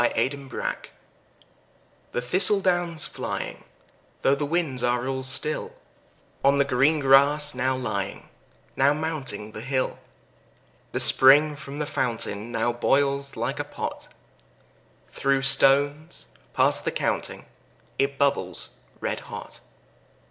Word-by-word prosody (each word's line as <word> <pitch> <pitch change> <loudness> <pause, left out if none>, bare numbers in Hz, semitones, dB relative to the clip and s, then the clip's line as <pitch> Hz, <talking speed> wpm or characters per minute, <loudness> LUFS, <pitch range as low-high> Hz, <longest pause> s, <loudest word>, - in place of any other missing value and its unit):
Autumn 140 0 -2 1.6
The 120 - -2
thistle 185 +10 +3
down's 175 -4 -1
flying, - - -5 0.6
though 135 - +4
the 145 +1 -2
winds 150 -6 -1
are 120 +1 0
all 135 0 -2
still, 130 +4 -1 0.7
On 140 +1 +4
the 140 - +3
green 140 +4 +2
grass 145 +2 +4
now 130 +1 0
lying, 100 -6 -4 0.5
now 140 +2 +3
mounting 135 -9 -3
the 105 - -8
hill, 130 +1 -2 0.9
The - - -2
spring 145 +3 +6
from 140 -1 -9
the 150 - -2
fountain 115 -4 -3
now 120 +1 0
boils 140 +3 0
like - - -3
a - - -1
pot; - - -6 1.0
Through 135 0 0
stones 145 +4 +3 0.3
past - - +2
the - - -1
counting - - -3 0.5
it 140 0 0
bubbles 135 - -1 0.3
red - - -2
hot. - - -10
140 Hz, 120 wpm, -25 LUFS, 130-150 Hz, 1.6 s, spring